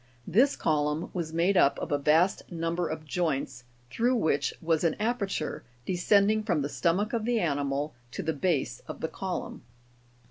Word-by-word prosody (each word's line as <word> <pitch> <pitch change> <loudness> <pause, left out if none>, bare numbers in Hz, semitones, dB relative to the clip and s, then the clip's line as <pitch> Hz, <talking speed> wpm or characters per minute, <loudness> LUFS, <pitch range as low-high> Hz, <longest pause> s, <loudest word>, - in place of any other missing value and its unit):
This 255 - +3
column 150 +1 0
was 170 -3 -3
made 170 +4 +2
up 140 -6 +4
of - - -5
a 145 - +2
vast 160 +8 +2
number 165 +1 -1
of 155 0 -5
joints, 140 -7 -2 0.3
through 240 - +2
which 160 -10 +1
was 165 -1 +1
an 165 -2 +2
aperture, 210 -7 -2 0.2
descending 200 +4 +3
from 175 -9 0
the 145 - -2
stomach 185 +9 0
of 230 -2 0
the 240 0 +1
animal 145 -2 -1 0.2
to - - -4
the 160 - 0
base 140 -6 0
of - - -7
the 160 - 0
column. 185 +2 -5
165 Hz, 170 wpm, -28 LUFS, 150-200 Hz, 0.3 s, up